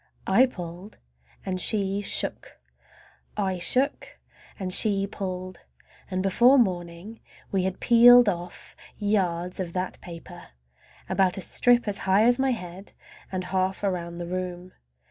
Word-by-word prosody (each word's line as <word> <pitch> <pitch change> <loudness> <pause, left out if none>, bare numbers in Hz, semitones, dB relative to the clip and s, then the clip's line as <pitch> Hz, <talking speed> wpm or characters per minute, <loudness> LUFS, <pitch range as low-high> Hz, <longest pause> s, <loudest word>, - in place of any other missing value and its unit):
I 240 +8 +4
pulled 180 -2 -10 0.5
and 185 -1 -2
she 200 -1 +1
shook, 205 - +1 0.8
I 190 -2 -2
shook 260 +10 +1 0.4
and 185 -2 -5
she 200 -1 +3
pulled, 185 -2 -7 0.4
and 185 -1 -3
before 240 +8 +4
morning 180 -1 -2 0.3
we 190 -2 0
had 190 -1 -4
peeled 245 0 +6
off 175 -2 -5 0.2
yards 180 -4 -1
of 175 -3 -5
that 185 0 -4
paper. 175 - -12 0.5
A - - -4 0.2
strip 245 +5 +2
about - - -19
as 200 -1 -1
high 195 +2 +2
as 245 +2 +3
my 265 0 +1
head 190 -4 -6 0.4
and 185 -1 -3
half 185 +2 -2
around 170 -3 -3
the 175 - -6
room. 180 0 -6
190 Hz, 135 wpm, -25 LUFS, 180-210 Hz, 0.8 s, peeled